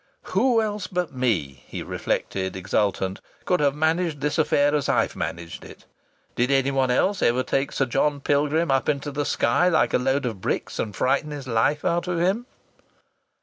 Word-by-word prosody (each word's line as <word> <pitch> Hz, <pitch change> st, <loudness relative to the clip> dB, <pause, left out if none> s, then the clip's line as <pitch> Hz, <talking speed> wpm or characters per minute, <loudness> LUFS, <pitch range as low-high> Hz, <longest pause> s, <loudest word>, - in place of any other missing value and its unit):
"Who 230 Hz, +3 st, +3 dB
else 210 Hz, -2 st, -3 dB
but 180 Hz, -4 st, -2 dB
me," 90 Hz, -, -1 dB
he -, -, -6 dB
reflected, 95 Hz, -1 st, -2 dB
exultant, 95 Hz, 0 st, -1 dB, 0.2 s
"could 180 Hz, -, +2 dB
have 140 Hz, -1 st, +2 dB
managed 160 Hz, 0 st, 0 dB
this 150 Hz, +2 st, -1 dB
affair 145 Hz, -1 st, +3 dB
as 150 Hz, -2 st, 0 dB
I've -, -, +1 dB
managed 85 Hz, 0 st, -5 dB
it? -, -, -13 dB, 0.5 s
Did 120 Hz, +2 st, +1 dB
anyone 135 Hz, -1 st, +2 dB
else 185 Hz, +10 st, +1 dB
ever 125 Hz, +2 st, +2 dB
take 135 Hz, +1 st, -1 dB
Sir 135 Hz, -, 0 dB
John 145 Hz, +3 st, 0 dB
Pilgrim 145 Hz, +3 st, +1 dB
up 135 Hz, 0 st, +1 dB
into 145 Hz, 0 st, -1 dB
the 145 Hz, +1 st, -2 dB
sky 180 Hz, -, +2 dB
like 160 Hz, -3 st, +2 dB
a -, -, +3 dB
load 135 Hz, +2 st, 0 dB
of 110 Hz, -6 st, -4 dB
bricks, -, -, -2 dB
and 105 Hz, -, -3 dB
frighten 140 Hz, +4 st, +1 dB
his 145 Hz, -3 st, -7 dB
life 125 Hz, +5 st, +1 dB
out 170 Hz, 0 st, 0 dB
of 180 Hz, -1 st, -1 dB
him?" 195 Hz, +8 st, 0 dB
140 Hz, 180 wpm, -24 LUFS, 125-165 Hz, 0.5 s, Who